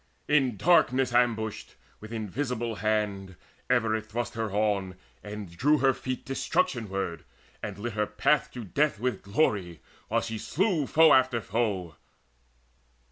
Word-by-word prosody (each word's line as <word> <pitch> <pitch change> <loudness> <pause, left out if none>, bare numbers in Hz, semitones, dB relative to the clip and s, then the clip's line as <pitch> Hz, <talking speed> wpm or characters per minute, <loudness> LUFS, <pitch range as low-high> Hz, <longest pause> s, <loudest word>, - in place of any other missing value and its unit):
In 135 -7 +2
darkness 130 - +3
ambushed, 115 -3 0 0.2
with 110 +1 -11
invisible 115 +1 -3
hand 100 -3 -1 0.3
Ever 115 -3 +2
it 110 0 -4
thrust 120 +2 -3
her 115 -1 -2
on, 100 -3 0 0.3
and 105 -4 -8
drew 145 - +3
her 135 -2 +3
feet 130 0 -5
Destruction 135 - -1
ward, 95 -3 -3 0.4
and 100 -2 -5
lit 115 +2 -4
her 105 0 0
path 130 +7 +1
to 125 - -6
death 140 +3 0
With 125 +2 -1
glory, 100 - 0 0.3
while - - +1
she 115 -1 -4
slew 175 - 0
foe 160 0 +6
after 130 -2 +4
foe. 100 -7 -2
110 Hz, 140 wpm, -28 LUFS, 105-130 Hz, 0.4 s, foe